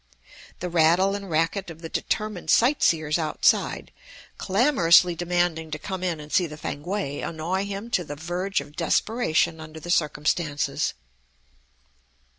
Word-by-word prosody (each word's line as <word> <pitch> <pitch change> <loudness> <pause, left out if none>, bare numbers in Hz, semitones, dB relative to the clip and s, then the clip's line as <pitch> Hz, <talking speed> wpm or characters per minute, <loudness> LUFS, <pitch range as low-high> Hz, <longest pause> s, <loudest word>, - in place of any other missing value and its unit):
The 180 - -3
rattle 170 +4 +4
and 200 -1 -5
racket 165 +4 0
of 165 0 -11
the - - -4
determined 210 0 -3
sight 255 - +4
seers 155 -1 +2
outside, 155 -2 +1 0.5
clamorously 185 - +4
demanding 175 -2 -1
to 150 - -4
come 185 +3 -5
in 175 -4 -1
and 150 0 -10
see 180 -2 +3
the 155 -1 -9
Fankwae, 150 0 -4
annoy 170 +4 -2
him 200 +4 -6
to 180 - +1
the 145 -2 -7
verge 175 +5 -2
of 150 - -13
desperation 170 -2 +1
under 155 0 -9
the 175 +2 -5
circumstances. 150 -2 0
170 Hz, 140 wpm, -25 LUFS, 155-190 Hz, 0.5 s, rattle